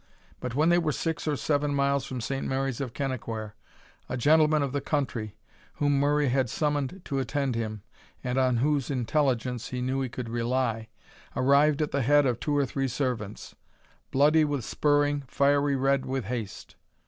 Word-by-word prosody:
But 125 -1 -5
when 155 +4 +3
they 175 0 +5
were 160 -3 0
six 160 +2 -3
or 150 - +1
seven 145 0 0
miles 140 -1 +1
from 130 -2 -5
Saint 135 +4 -3
Mary's 135 -1 -1
of 130 -4 -3
Kennaquhair, 115 -5 -4 0.6
a 130 - -2
gentleman 155 +3 +4
of 140 - -2
the 140 +1 -2
country, 115 -9 -2 0.4
whom 145 -1 +2
Murray 145 0 +2
had 130 -1 +1
summoned 150 - -1
to 140 -2 -2
attend 135 +1 -1
him, 110 -3 -4 0.4
and 125 +1 0
on 130 -2 +2
whose 145 +2 +1
intelligence 125 -2 0
he 125 - -4
knew 130 +2 -1
he 130 - -2
could 125 0 -6
rely, 115 -1 -1 0.5
arrived 145 +3 +4
at 150 - -3
the 140 - 0
head 145 +3 +4
of 120 -3 0
two 145 -2 0
or 140 - +3
three 135 +1 -2
servants, 120 -5 -3 0.6
"bloody 150 +3 +4
with 145 -6 -1
spurring, 145 -1 +1
fiery 140 +1 +2
red 135 0 +1
with 130 -3 -2
haste." 115 -2 -6
135 Hz, 175 wpm, -27 LUFS, 125-145 Hz, 0.6 s, they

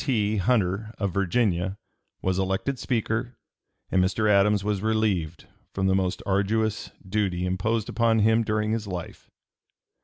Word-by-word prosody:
T. 110 -6 +1
Hunter, 105 -1 +1
of 100 -4 -2
Virginia, 95 -1 0 0.5
was 95 0 0
elected 95 +8 -1
Speaker, 120 0 -1 0.6
and 95 - +3
Mr. 100 +3 +1
Adams 105 0 +4
was 105 -2 -1
relieved 105 -7 0 0.3
from 95 - 0
the 95 - +3
most 95 -1 -1
arduous 105 +3 0 0.2
duty 95 -3 0
imposed 105 +4 -1
upon 115 -1 +2
him 110 +1 +4
during 110 0 0
his 110 -2 -2
life. 90 -3 -7
105 Hz, 135 wpm, -26 LUFS, 95-110 Hz, 0.6 s, Adams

